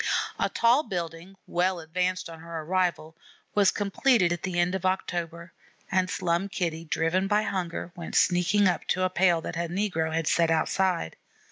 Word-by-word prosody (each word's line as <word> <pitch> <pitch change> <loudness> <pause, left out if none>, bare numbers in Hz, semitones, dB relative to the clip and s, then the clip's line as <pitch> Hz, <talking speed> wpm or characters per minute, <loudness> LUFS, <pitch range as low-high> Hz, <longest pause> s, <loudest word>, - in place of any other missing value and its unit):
A - - +1
tall 235 +5 +3
building, 175 - -6
well 180 +1 0
advanced 180 +3 -2
on 165 -1 -10
her 165 0 -6
arrival, 175 -1 -1 0.4
was 200 -2 +4
completed 205 -2 +2
at 175 - -5
the 180 -2 -2
end 175 +1 +2
of 190 - -3
October, 170 -2 -2 0.4
and 185 -1 +2
Slum 180 +1 -1
Kitty, 170 -4 -3
driven 165 +4 0
by 210 +1 +2
hunger, 175 -4 -3
went 170 -2 -7
sneaking 185 +3 +3
up 175 -3 -1
to 185 - +1
a 185 - +1
pail 175 -2 +3
that - - -6
a 170 0 -2
negro 175 -4 -1
had 165 0 -1
set 165 +1 +2
outside. 165 - 0
180 Hz, 170 wpm, -27 LUFS, 165-190 Hz, 0.4 s, was